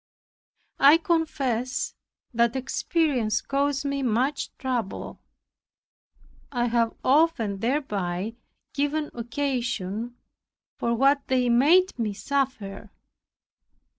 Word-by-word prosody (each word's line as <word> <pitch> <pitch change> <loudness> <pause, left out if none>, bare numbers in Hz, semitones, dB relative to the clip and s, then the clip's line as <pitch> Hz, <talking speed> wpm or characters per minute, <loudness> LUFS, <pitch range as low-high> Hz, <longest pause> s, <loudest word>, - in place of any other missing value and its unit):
I 285 +4 +8
confess 275 -8 -1 0.4
that 235 +1 +2
inexperience 265 - 0
caused 280 0 -1
me 280 0 -1
much 255 +4 0
trouble. 245 -6 -3 1.3
I 240 -3 0
have 230 -1 +1
often 260 -9 +2
thereby 210 -6 -2 0.4
given 290 +2 -1
occasion 240 -3 -3 0.6
for 235 0 0
what 275 +3 +3
they 255 -2 +2
made 305 +8 +4
me 215 -3 -1
suffer. 225 -7 -2
255 Hz, 85 wpm, -26 LUFS, 230-280 Hz, 1.3 s, I